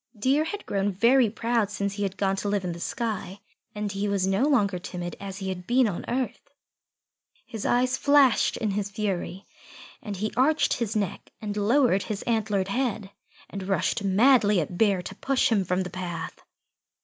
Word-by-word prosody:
Deer 270 +8 +2
had 410 +5 -5
grown 200 0 0
very 235 +5 +4
proud 230 -1 0
since 200 -1 -2
he 205 - -6
had 195 -1 -2
gone 195 -1 +1
to 200 +1 -3
live 200 -1 0
in 175 - -2
the 170 - -7
sky, 210 -2 -3 0.4
and 210 -1 -3
he 200 +1 -2
was 200 -2 +1
no 195 +7 +2
longer 205 -10 +2
timid 175 -1 -6
as 195 -1 -7
he 190 -2 -4
had 180 -1 -6
been 250 0 +4
on 185 -5 -4
earth. 255 +2 -3 1.0
His 225 -4 -5
eyes 250 +2 +2
flashed 280 -3 +4
in 215 -3 -1
his 200 0 -2
fury, 195 -2 -3 0.6
and 205 -2 -6
he 215 +3 -3
arched 295 +5 +3
his 225 -2 -2
neck 200 -4 -2
and 205 -1 -4
lowered 215 0 +3
his 205 -1 -4
antlered 210 -4 0
head, 220 -4 -2 0.4
and 195 -1 -7
rushed 195 +3 0
madly 210 0 +4
at 170 +2 -3
Bear 195 -2 +2
to 195 - -7
push 265 +4 +1
him 205 -4 +3
from 180 +1 0
the 180 - -7
path. 175 -3 -6
205 Hz, 185 wpm, -26 LUFS, 195-235 Hz, 1.0 s, very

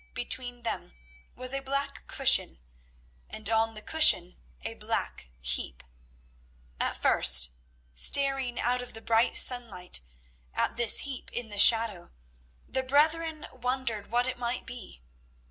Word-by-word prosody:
Between 245 0 -2
them 225 - -6 0.4
was 255 +1 -4
a 275 - -2
black 275 +1 -5
cushion, - - +3 0.7
and 215 -1 -2
on 225 0 0
the 215 - -11
cushion 305 - +4 0.2
a - - -5
black - - -5
heap. - - 0 1.0
At - - -1
first, 65 0 +3 0.4
staring 270 - +2
out 250 +1 -1
of 245 - -10
the 225 - -10
bright 230 +1 +1
sunlight 225 - 0 0.5
at - - -1
this 235 -2 +4
heap 275 -3 -7
in 240 -2 -5
the 205 -1 -6
shadow, 225 -6 +5 0.6
the 260 - -2
brethren 310 +4 0
wondered 250 -4 -3
what 245 +1 0
it 255 -1 -5
might 240 +1 -4
be. 230 - -11
245 Hz, 130 wpm, -27 LUFS, 215-260 Hz, 1.0 s, shadow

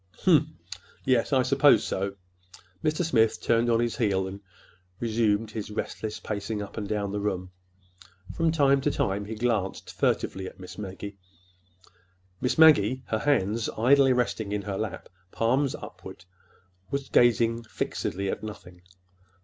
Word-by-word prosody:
"Humph! - - +5 0.6
Yes, 130 -1 +2
I 130 -2 +4
suppose 140 +2 +5
so." 100 +1 -2 0.7
Mr. 155 +3 +1
Smith 115 -8 +2
turned 115 +1 +2
on 115 -1 +3
his 120 -2 -1
heel 95 -5 +1
and 95 +1 -7 0.6
resumed 110 -2 +1
his 110 -2 -5
restless 105 0 -4
pacing 105 0 -4
up 100 -1 -7
and 105 -2 -4
down 105 -2 -1
the 105 - -2
room. 95 -3 -3 0.8
From 165 -1 +1
time 140 -3 +3
to 145 - +1
time 100 -6 -1
he 110 +2 -6
glanced 110 -4 -2
furtively 95 -1 -1
at - - -12
Miss 90 +2 -10
Maggie. 100 0 -7 1.2
Miss 125 - 0
Maggie, 130 -6 +6
her 110 - 0
hands 110 -5 +1
idly 135 +4 +5
resting 120 -4 0
in 105 -1 -2
her 100 -1 -4
lap, 105 -2 -4 0.2
palms 130 +4 +1
upward, 90 - -11 0.6
was 140 -1 -3
gazing 115 -1 +3
fixedly 100 -3 -3
at - - -3
nothing. 95 -4 -9
110 Hz, 145 wpm, -27 LUFS, 100-125 Hz, 1.2 s, Maggie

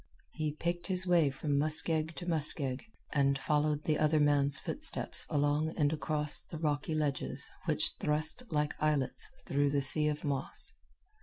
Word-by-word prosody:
He 155 -1 -4
picked 175 +2 -4
his 185 -1 +3
way 170 -5 +2
from 140 +1 -2
muskeg 155 +1 +2
to 155 - -8
muskeg, 145 -5 0 0.3
and 140 -1 +1
followed 150 +1 -1
the 155 -2 -1
other 155 0 +2
man's 145 -1 +2
footsteps - - -1
along 145 +2 -1
and 150 -1 +1
across 150 -1 +3
the 160 - -10
rocky 150 0 -2
ledges 145 -3 -2 0.2
which - - +2
thrust 155 +9 0
like 150 -3 -1
islets 150 -3 -1 0.2
through 145 0 0
the 140 0 0
sea 150 +3 +8
of 150 0 -3
moss. 140 -3 -4
150 Hz, 155 wpm, -31 LUFS, 145-155 Hz, 0.3 s, sea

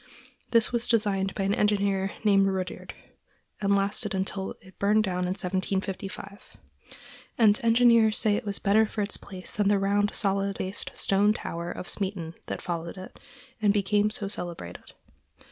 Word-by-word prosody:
This 230 -2 +3
was 235 -1 0
designed 200 -4 +1
by 195 - -1
an 195 +1 +1
engineer 200 -2 +1
named 195 -2 +4
Rudyerd, 190 -1 -4 0.7
and 200 0 +3
lasted 200 +1 0
until 190 0 -2 0.2
burned 210 +2 +3
down 180 -2 -1
in 180 +1 -1
1755; 195 +1 -4 0.8
and 215 -3 +5
engineers 230 -2 +5
say 210 -2 +3
it - - -2
was 200 -2 -1
better 215 +2 +3
for 210 0 -2
its 200 - -2
place 185 -2 -6
than 210 - -1
was 205 - +4
the - - +3
round, 205 +1 +1
solid 195 -1 0
based 190 +2 -3
stone 205 +2 +2
tower 170 -4 -5
of 180 - -7
Smeaton 185 -5 -3
that - - -5
followed 170 0 -4
it, 185 - -10 0.4
and 205 -2 +4
became 205 +1 +2
so 210 -1 -4
celebrated. 170 - -7
200 Hz, 160 wpm, -27 LUFS, 190-210 Hz, 0.8 s, and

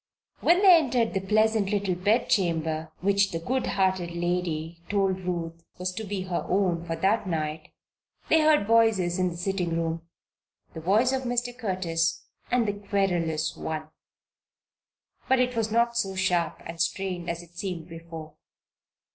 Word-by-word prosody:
When 355 +4 +4
they 360 -4 +8
returned 245 -4 0
from 195 - 0
the 190 - -12
pleasant 215 -1 +3
little 200 -2 0
bed 205 +7 +1
chamber 160 -4 0
which 200 +1 +3
the 165 - -3
good 250 +10 -1
hearted 190 -3 +1
lady 170 -2 -2
told 195 -2 +1
Ruth 170 -2 -4
was 180 0 -3
to 220 - -5
be 200 -2 -3
her 185 -2 -2
own 180 -3 +1
for 165 -1 -2
that 200 +4 +1
night, 155 -2 -3 0.6
they 320 - +5
heard 305 -8 +4
voices 215 -5 +3
in 185 0 +2
the 170 - -7
sitting 180 -2 -1
room 165 0 -2 0.7
the 160 - -7
voice 215 +10 +3
of 265 - 0
Mr. 245 -1 -1
Curtis 180 -7 -1 0.2
and 245 -3 +2
the 205 - 0
querulous 185 -6 -1
one. 155 -1 -5 1.4
But 265 0 +4
it 250 -1 +1
was 225 -1 0
not 235 +1 +2
so 195 -4 -1
sharp 180 -3 0
and 165 0 -4
strained 180 0 -2
as 170 0 -3
it 175 0 -20
seemed 175 -3 -5
before. 165 -2 -9
185 Hz, 165 wpm, -27 LUFS, 170-215 Hz, 1.4 s, they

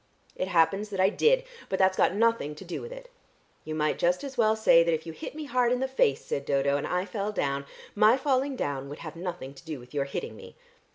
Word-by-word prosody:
"It 185 - -2
happens 190 +4 +2
that 195 -2 -5
I 190 +1 +5
did, - - +3 0.3
but 190 - 0
that's 190 0 +3
got 190 - +2
nothing 230 -9 +1
to 170 - -11
do 175 - -5
with 475 - -8
it." - - -10 0.5
"You 155 - -5
might 150 0 0
just 175 +5 +1
as 275 -1 -6
well 220 -3 +3
say 220 -6 +6
that 165 -1 +2
if 160 - -7
you 165 - -6
hit 250 - -8
me 310 - -5
hard 250 -3 +1
in 250 - +1
the 265 - 0
face," 205 - +1
said 140 - -2
Dodo, 140 0 +1
"and 145 - -2
I 180 +1 -1
fell 205 +1 -3
down, 140 -7 -2 0.3
my 215 +4 +5
falling 270 0 0
down 140 - -3
would 145 - -7
have 155 0 -7
nothing 170 -6 -6
to 140 - -15
do 155 -4 -6
with 125 +3 -15
your 140 -1 0
hitting 140 - -5
me." - - -12
185 Hz, 250 wpm, -28 LUFS, 150-235 Hz, 0.5 s, say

